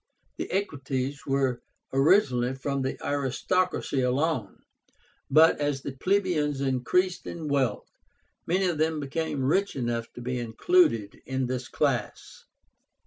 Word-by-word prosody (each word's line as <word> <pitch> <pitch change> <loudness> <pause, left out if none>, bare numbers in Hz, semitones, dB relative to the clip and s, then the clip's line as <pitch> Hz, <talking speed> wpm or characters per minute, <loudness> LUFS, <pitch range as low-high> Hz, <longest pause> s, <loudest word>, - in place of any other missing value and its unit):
The - - -4
Equites 140 -7 -2
were 135 -3 +1 0.3
originally 135 -4 +3
from 140 +1 -2
the 130 - -2
aristocracy 145 +2 0
alone, 130 -3 -1 0.7
but, 160 +3 +6
as 145 -2 -1
the - - -4
plebeians 155 -2 0
increased 140 +8 0
in 160 -3 -5
wealth, 140 -4 0 0.6
many 185 +3 +2
of 170 -4 0
them 160 0 +1
became 150 -1 -2
rich 195 +8 +1
enough 120 -3 -2
to 125 - -9
be 125 +1 -2
included 115 - +2
in 130 0 -1
this 125 0 -3
class. - - -2
140 Hz, 125 wpm, -27 LUFS, 130-160 Hz, 0.7 s, but